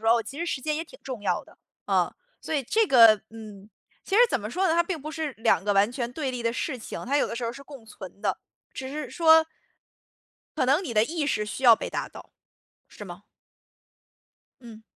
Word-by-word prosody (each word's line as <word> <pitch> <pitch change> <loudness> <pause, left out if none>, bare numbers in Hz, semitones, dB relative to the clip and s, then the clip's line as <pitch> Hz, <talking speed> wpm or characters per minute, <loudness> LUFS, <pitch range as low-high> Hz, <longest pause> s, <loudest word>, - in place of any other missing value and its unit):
说， 225 +2 +4
哦， 230 - -1
其 275 +6 -9
实 340 - -2
时 275 - -2
间 305 +2 -2
也 325 - -3
挺 - - -16
重 250 -6 -7
要 - - -1
的， - - -20 0.3
呃， - - +1 0.3
所 315 - -4
以 280 - 0
这 440 - +1
个 230 - +7
嗯。 215 -2 -12 0.4
其 390 - -2
实 450 - +6
怎 - - 0
么 210 -1 -6
说 375 +8 0
呢， 320 - +2
它 340 - +4
并 340 -2 -4
不 305 +3 -7
是 315 -3 -4
2 225 -6 +2
个 205 - +1
完 200 +3 +3
全 245 -1 -4
对 275 -2 -3
立 245 -2 -5
的 230 0 0
事 270 +2 -3
情， - - -7
它 280 +2 +1
有 - - +2
的 - - -5
时 240 - -5
候 230 - -1
儿 - - -4
是 280 - -10
共 270 -5 -13
存 200 -2 -11
的， - - -1 0.4
只 260 - -6
是 300 +1 -5
说 320 -1 +5 1.1
可 - - +2
能 290 +8 +3
你 235 - -5
的 215 - +5
意 315 0 -3
识 210 -6 0
需 210 +5 -6
要 235 -2 +9
被 - - -6
达 - - -3
到， - - -13 0.6
是 205 - -11
吗？ 180 +1 -10 1.4
嗯。 225 -2 -13
255 Hz, 250 characters per minute, -26 LUFS, 220-310 Hz, 1.4 s, 要